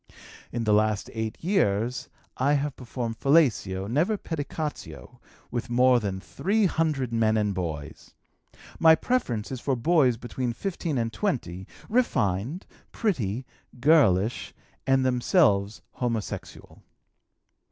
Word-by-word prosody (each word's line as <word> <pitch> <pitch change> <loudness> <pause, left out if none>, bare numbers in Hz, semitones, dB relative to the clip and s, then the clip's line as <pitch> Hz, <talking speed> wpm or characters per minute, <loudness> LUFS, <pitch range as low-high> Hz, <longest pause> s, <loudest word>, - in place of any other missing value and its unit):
"In 120 -1 -2
the 105 -1 +2
last 105 0 +1
eight 110 -1 -3
years 125 - 0 0.3
I 140 +3 +2
have 145 -1 -1
performed 120 -2 -5
fellatio 115 - +2
(never 160 - +1
pedicatio) 155 -2 -6 0.3
with 120 -1 -3
more 125 +1 +4
than 100 -4 -3
three 205 - 0
hundred 155 -8 0
men 110 -1 +2
and 105 -2 0
boys. 80 -5 -6 0.6
My 160 -1 +7
preference 125 - -1
is 130 -2 -5
for 135 - 0
boys 130 -2 +3
between 120 +1 -3
15 170 +1 -3
and 115 -1 -1
20, 95 - -3 0.2
refined, 135 - 0 0.3
pretty, 130 - -1 0.3
girlish, 120 - +3 0.3
and 135 -1 +3
themselves 120 - +2
homosexual. 115 -4 -5
125 Hz, 115 wpm, -26 LUFS, 110-150 Hz, 0.6 s, My